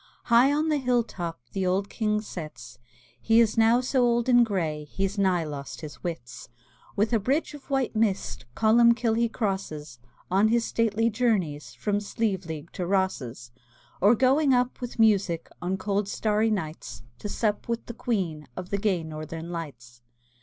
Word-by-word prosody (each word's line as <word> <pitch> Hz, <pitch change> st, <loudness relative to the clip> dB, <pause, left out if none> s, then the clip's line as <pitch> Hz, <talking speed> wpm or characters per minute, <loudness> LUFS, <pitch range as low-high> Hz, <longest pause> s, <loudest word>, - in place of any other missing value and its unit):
High 240 Hz, +4 st, +5 dB
on 305 Hz, +2 st, +1 dB
the 300 Hz, -2 st, +2 dB
hill 245 Hz, -2 st, +2 dB
top 170 Hz, -, -6 dB
The 195 Hz, -, -2 dB
old 190 Hz, +2 st, +1 dB
King 210 Hz, -1 st, -1 dB
sits; 155 Hz, -, -9 dB, 0.4 s
He 225 Hz, 0 st, +4 dB
is 225 Hz, -2 st, +3 dB
now 225 Hz, +2 st, +4 dB
so 255 Hz, +1 st, +1 dB
old 235 Hz, 0 st, +2 dB
and 245 Hz, -1 st, +6 dB
gray 165 Hz, -9 st, -2 dB
He's 195 Hz, +6 st, -2 dB
nigh 185 Hz, -3 st, +2 dB
lost 145 Hz, -3 st, -7 dB
his 145 Hz, -6 st, -9 dB
wits. 165 Hz, -9 st, -6 dB, 0.5 s
With 215 Hz, +4 st, +1 dB
a 225 Hz, -, +4 dB
bridge 275 Hz, +10 st, 0 dB
of 290 Hz, -1 st, -12 dB
white 270 Hz, -4 st, 0 dB
mist 210 Hz, -, -1 dB
Columbkill 235 Hz, +1 st, +4 dB
he 235 Hz, 0 st, +2 dB
crosses, 160 Hz, -, -4 dB, 0.3 s
On 195 Hz, +3 st, +4 dB
his 230 Hz, +1 st, +2 dB
stately 225 Hz, 0 st, +1 dB
journeys 200 Hz, -11 st, -1 dB
From 205 Hz, -1 st, -1 dB
Slieveleague 190 Hz, -7 st, -3 dB
to 180 Hz, -2 st, -4 dB
Rosses; 140 Hz, -11 st, -1 dB, 0.5 s
Or 205 Hz, +5 st, +6 dB
going 265 Hz, +3 st, +4 dB
up 250 Hz, +1 st, 0 dB
with 245 Hz, -1 st, -6 dB
music 200 Hz, -7 st, +2 dB
On 185 Hz, +2 st, -1 dB
cold 200 Hz, +1 st, -1 dB
starry 215 Hz, +2 st, +1 dB
nights, 155 Hz, -, -4 dB, 0.2 s
To 210 Hz, -, -5 dB
sup 210 Hz, 0 st, -1 dB
with 235 Hz, 0 st, -2 dB
the 235 Hz, -, -7 dB
Queen 195 Hz, -, -2 dB
Of 185 Hz, -1 st, -6 dB
the 200 Hz, -, 0 dB
gay 195 Hz, -5 st, +1 dB
Northern 160 Hz, +2 st, -7 dB
Lights. 120 Hz, -8 st, -8 dB
205 Hz, 165 wpm, -26 LUFS, 165-230 Hz, 0.5 s, and